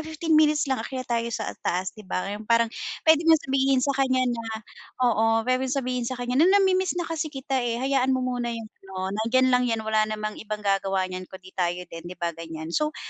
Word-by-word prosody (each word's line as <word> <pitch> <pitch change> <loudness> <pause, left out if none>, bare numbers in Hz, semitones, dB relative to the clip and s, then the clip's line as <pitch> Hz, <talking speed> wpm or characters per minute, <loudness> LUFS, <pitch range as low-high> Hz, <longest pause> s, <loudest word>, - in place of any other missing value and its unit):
15 315 +1 -3
minutes 305 0 +5
lang, 265 -4 -1
akyat 255 +2 -5
tayo 235 0 0
sa 220 -2 -3
taas. 185 +1 -1
'Di - - -13
ba 185 - -1
yung 210 +1 -8
parang 230 0 +3 0.3
puwede 320 -1 +6
mong 320 - +8
sabihin 270 -1 +2
sa 280 - +1
kanya 260 -1 +3
na 240 -2 -1 0.6
oo, 225 -1 +3
puwedeng 255 +1 +1
sabihin 250 -2 -1
sa 255 - -4
kanya 245 +2 0
na, 340 - +6
"Namimiss 375 -2 +2
na 345 - -1
kasi 325 -1 -3
kita, 270 -2 -2
eh, 235 -1 -1
hayaan 265 -1 +2
mo 255 - -1
muna 245 -1 -2
yung 230 -1 -4 0.2
ano, 190 0 -5
nandiyan 250 +5 +2
lang 250 0 +3
'yan, 225 -1 -1
wala 215 0 +2
namang 215 0 -4
ibang 210 -1 -5
gagawa 195 -1 +1
niyan 185 0 -6
kung - - -9
'di 185 - -13
tayo 180 0 -1
din." 165 +1 -8
'Di 180 - -9
ba? 170 -1 -2
Ganyan. 165 0 -7
So, 305 - 0
240 Hz, 225 wpm, -25 LUFS, 210-270 Hz, 0.6 s, mong